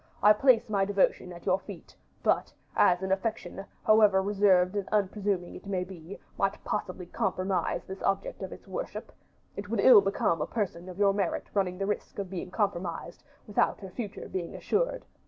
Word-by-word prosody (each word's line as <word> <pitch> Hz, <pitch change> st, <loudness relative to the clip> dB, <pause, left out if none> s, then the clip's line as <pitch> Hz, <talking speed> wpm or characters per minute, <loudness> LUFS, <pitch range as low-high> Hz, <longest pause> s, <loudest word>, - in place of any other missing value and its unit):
I 210 Hz, +1 st, +8 dB
place 245 Hz, +1 st, +4 dB
my 200 Hz, -3 st, +1 dB
devotion 195 Hz, -2 st, +1 dB
at 170 Hz, -1 st, -11 dB
your 190 Hz, 0 st, +2 dB
feet; 195 Hz, -3 st, -11 dB, 0.3 s
but, -, -, +1 dB, 0.2 s
as 180 Hz, +1 st, +4 dB
an 190 Hz, -, -2 dB
affection, 195 Hz, 0 st, -2 dB, 0.2 s
however 215 Hz, -3 st, +6 dB
reserved 195 Hz, -2 st, +3 dB
and 200 Hz, -2 st, -2 dB
unpresuming 200 Hz, -3 st, 0 dB
it -, -, -11 dB
may 185 Hz, -2 st, -1 dB
be, 180 Hz, 0 st, -10 dB, 0.2 s
might 195 Hz, 0 st, 0 dB
possibly 185 Hz, -3 st, -3 dB
compromise 190 Hz, -1 st, -1 dB
the 190 Hz, 0 st, -8 dB
object 195 Hz, 0 st, -1 dB
of -, -, -5 dB
its -, -, -11 dB
worship, -, -, -5 dB, 0.4 s
it 200 Hz, 0 st, -6 dB
would 225 Hz, -1 st, -1 dB
ill 205 Hz, 0 st, +8 dB
become 195 Hz, -5 st, 0 dB
a -, -, -1 dB
person 185 Hz, -5 st, -3 dB
of 180 Hz, -, -9 dB
your 200 Hz, -1 st, +4 dB
merit 195 Hz, -4 st, -1 dB
running 185 Hz, -3 st, 0 dB
the 195 Hz, -, -1 dB
risk 205 Hz, +1 st, -3 dB
of 195 Hz, -2 st, -4 dB
being 185 Hz, -1 st, -5 dB
compromised, 180 Hz, -4 st, -3 dB, 0.2 s
without 205 Hz, -, +1 dB
her 190 Hz, -2 st, -8 dB
future 210 Hz, -3 st, -6 dB
being 175 Hz, -3 st, -4 dB
assured. -, -, -1 dB
195 Hz, 180 wpm, -29 LUFS, 185-205 Hz, 0.4 s, I